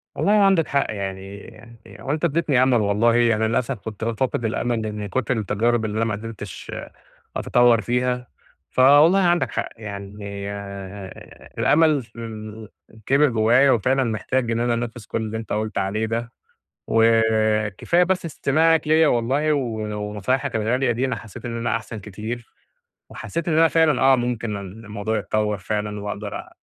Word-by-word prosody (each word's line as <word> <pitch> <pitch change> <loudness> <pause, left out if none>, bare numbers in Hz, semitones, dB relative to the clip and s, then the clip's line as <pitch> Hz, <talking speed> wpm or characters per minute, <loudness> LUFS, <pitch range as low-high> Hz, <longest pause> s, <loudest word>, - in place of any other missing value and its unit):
والله 200 - +1
عندك 195 -5 +4
حق، 140 -1 +1
يعني 100 +3 -7 0.2
هو 135 - -4
أنتَ 155 +3 0
أديّتني 150 -5 +2
أمل 130 0 +3
والله. 105 +3 +2
يعني 115 -2 +3
للأسف، 120 +1 -1
كُنت 110 0 -7
فاقد 115 +1 -1
الأمل 110 0 -1
من 105 -1 -5
كُتر 125 +2 -1
التجارب 110 +2 0
اللي 105 0 -3
أنا 115 - +1
ما 110 - -1
قدرتش 105 -2 -8 0.7
أتطور 120 -2 +4
فيها. 125 +3 -1 0.4
فوالله 145 +8 +6
عندك 175 -2 +2
حق، - - -3
يعني 100 -2 -8 1.4
الأمل 155 -3 +3
فمل 110 -2 -9 0.4
كِبر 145 +2 +4
جوّايا، 120 +4 +4
وفعلًا 130 +4 +2
محتاج 120 +1 -1
إن 115 - 0
أنا 120 0 +1
أنفذ 115 -1 -4
كل - - -2
اللي 110 0 -4
أنت 110 - -5
قُلت 110 +1 -2
عليه 105 +3 0
ده. 115 +1 -3 0.6
وكفاية 110 - +2
بس 185 0 -1
استماعك 160 +1 +2
ليَّ 160 +1 +5
والله 135 +5 +1
و 145 - +2 0.5
ونصايحك 115 +5 -1
الغالية 120 +4 +1
دي، 120 +3 -1
أنا 125 -3 -1
حسّيت 110 +1 -11
إن 120 -1 -4
أنا 115 0 0
أحسن 110 0 -7
كتير، 110 +4 -7 0.6
وحسّيت 170 0 -5
إن 160 -2 +1
أنا 165 0 +6
فعلًا 160 -5 +2
آه، 135 0 +6
ممكن 120 -4 -2
الموضوع 105 +2 -5
يتطور 105 0 -1
فعلًا، 105 +2 -3
وأقدرأ 105 0 -6
115 Hz, 150 wpm, -22 LUFS, 110-130 Hz, 1.4 s, فوالله